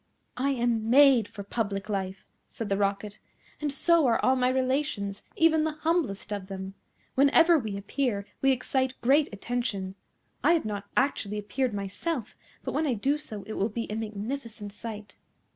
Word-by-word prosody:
"I 270 Hz, +2 st, +1 dB
am 235 Hz, -4 st, 0 dB
made 265 Hz, -4 st, +6 dB
for 200 Hz, -, -8 dB
public 200 Hz, -1 st, -2 dB
life," 195 Hz, -2 st, -3 dB, 0.2 s
said 225 Hz, -2 st, -5 dB
the 195 Hz, -, +2 dB
Rocket, 200 Hz, +1 st, -1 dB, 0.4 s
"and 295 Hz, -1 st, 0 dB
so 325 Hz, +1 st, +4 dB
are 230 Hz, -, +3 dB
all 260 Hz, -, +5 dB
my 250 Hz, -1 st, +2 dB
relations, 255 Hz, -6 st, -1 dB
even 320 Hz, -1 st, +4 dB
the 315 Hz, -1 st, 0 dB
humblest 310 Hz, -, -1 dB
of 200 Hz, -2 st, -5 dB
them. 190 Hz, 0 st, -6 dB, 0.4 s
Whenever 315 Hz, +5 st, +5 dB
we 215 Hz, -5 st, -4 dB
appear 200 Hz, 0 st, -1 dB, 0.2 s
we 270 Hz, -, +5 dB
excite 260 Hz, 0 st, 0 dB
great 280 Hz, +4 st, +4 dB
attention. 205 Hz, -3 st, -3 dB, 0.5 s
I 335 Hz, -, +6 dB
have 330 Hz, -, +1 dB
not 205 Hz, -2 st, -3 dB
actually 210 Hz, -6 st, +1 dB
appeared 215 Hz, +3 st, -1 dB
myself, 205 Hz, -, -3 dB, 0.3 s
but -, -, -3 dB
when 310 Hz, 0 st, +1 dB
I 255 Hz, -, +1 dB
do 275 Hz, +8 st, +1 dB
so 215 Hz, -8 st, -7 dB
it 215 Hz, -, -7 dB
will 205 Hz, +2 st, 0 dB
be 230 Hz, +1 st, -3 dB
a -, -, -2 dB
magnificent 220 Hz, 0 st, -5 dB
sight. 210 Hz, -1 st, -8 dB
230 Hz, 170 wpm, -28 LUFS, 205-275 Hz, 0.5 s, made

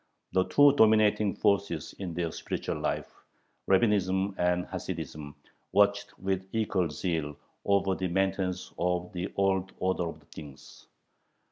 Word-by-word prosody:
The 95 Hz, 0 st, +2 dB
two 145 Hz, -1 st, +6 dB
dominating 110 Hz, -4 st, +4 dB
forces 100 Hz, -7 st, 0 dB
in 90 Hz, -4 st, -5 dB
their 85 Hz, -2 st, -1 dB
spiritual -, -, -4 dB
life, -, -, -3 dB, 0.5 s
Rabbinism 95 Hz, -1 st, +2 dB
and 90 Hz, 0 st, +1 dB
Hasidism, 75 Hz, -1 st, -6 dB, 0.4 s
watched 100 Hz, 0 st, +2 dB
with 95 Hz, 0 st, -2 dB
equal 105 Hz, -6 st, 0 dB
zeal 75 Hz, -2 st, -3 dB, 0.3 s
over 100 Hz, -1 st, +2 dB
the 95 Hz, 0 st, -2 dB
maintenance 95 Hz, 0 st, -1 dB
of 90 Hz, +1 st, -1 dB
the 90 Hz, +2 st, -4 dB
old 95 Hz, -1 st, +1 dB
order 95 Hz, -1 st, 0 dB
of -, -, -11 dB
things. 70 Hz, -3 st, -12 dB
95 Hz, 125 wpm, -29 LUFS, 90-100 Hz, 0.5 s, two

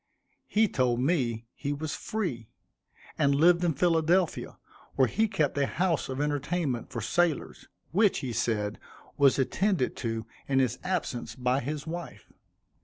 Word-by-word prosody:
He 220 Hz, +1 st, +3 dB
told 125 Hz, -7 st, +1 dB
me 125 Hz, -6 st, 0 dB
he 140 Hz, -, -4 dB
was 150 Hz, +1 st, -4 dB
free, 150 Hz, -, -3 dB, 0.7 s
and 140 Hz, 0 st, +4 dB
lived 170 Hz, +4 st, +5 dB
in 165 Hz, -4 st, +1 dB
Philadelphia, 170 Hz, +2 st, +1 dB, 0.4 s
where 130 Hz, -2 st, +4 dB
he 220 Hz, -, +1 dB
kept 160 Hz, -9 st, 0 dB
a 140 Hz, -, +2 dB
house 170 Hz, -4 st, 0 dB
of 130 Hz, +1 st, -4 dB
entertainment 145 Hz, -2 st, -1 dB
for 120 Hz, -, -4 dB
sailors, 165 Hz, +7 st, 0 dB, 0.2 s
which, 200 Hz, +4 st, +3 dB
he 125 Hz, -, -3 dB
said, 105 Hz, -2 st, -1 dB, 0.4 s
was 140 Hz, -2 st, +4 dB
attended 175 Hz, +3 st, +1 dB
to 115 Hz, -2 st, -3 dB, 0.2 s
in 135 Hz, -, +1 dB
his 125 Hz, -2 st, +1 dB
absence 175 Hz, -10 st, -2 dB
by 125 Hz, 0 st, +1 dB
his 145 Hz, +2 st, -4 dB
wife. 170 Hz, +1 st, -7 dB
145 Hz, 145 wpm, -28 LUFS, 125-175 Hz, 0.7 s, lived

